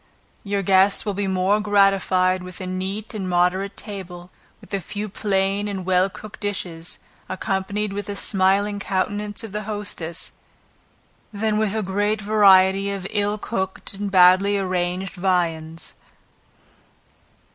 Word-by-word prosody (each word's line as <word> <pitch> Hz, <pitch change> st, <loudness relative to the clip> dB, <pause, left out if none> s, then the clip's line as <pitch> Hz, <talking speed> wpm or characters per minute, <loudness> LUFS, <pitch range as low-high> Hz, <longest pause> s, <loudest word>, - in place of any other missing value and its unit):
Your 200 Hz, -1 st, -1 dB
guests 195 Hz, +2 st, +4 dB
will 205 Hz, -, -1 dB
be 200 Hz, 0 st, -2 dB
more 190 Hz, +2 st, +2 dB
gratified 195 Hz, -3 st, +3 dB
with 180 Hz, -1 st, -8 dB
a 185 Hz, -, -5 dB
neat 190 Hz, +4 st, -4 dB
and 195 Hz, -4 st, -3 dB
moderate 180 Hz, +3 st, +1 dB
table, 185 Hz, -3 st, -8 dB, 0.3 s
with -, -, -15 dB
a 195 Hz, -, 0 dB
few 210 Hz, +3 st, -5 dB
plain 195 Hz, 0 st, 0 dB
and 195 Hz, -3 st, -4 dB
well 185 Hz, +1 st, +3 dB
cooked 215 Hz, +2 st, -11 dB
dishes, 180 Hz, -5 st, -4 dB, 0.3 s
accompanied 195 Hz, +2 st, -2 dB
with 205 Hz, 0 st, -4 dB
the 205 Hz, -, -4 dB
smiling 200 Hz, +1 st, +2 dB
countenance 205 Hz, +2 st, -2 dB
of 225 Hz, -, -7 dB
the 210 Hz, +1 st, -3 dB
hostess, 200 Hz, -6 st, -2 dB, 1.0 s
than 215 Hz, 0 st, 0 dB
with 215 Hz, -1 st, 0 dB
a 220 Hz, -, 0 dB
great 205 Hz, +3 st, 0 dB
variety 195 Hz, -2 st, +5 dB
of 195 Hz, -2 st, -4 dB
ill 205 Hz, 0 st, 0 dB
cooked 190 Hz, -3 st, -3 dB
and 200 Hz, +1 st, -3 dB
badly 190 Hz, +2 st, +5 dB
arranged 185 Hz, 0 st, -2 dB
viands. 165 Hz, -3 st, -1 dB
195 Hz, 135 wpm, -22 LUFS, 185-205 Hz, 1.0 s, variety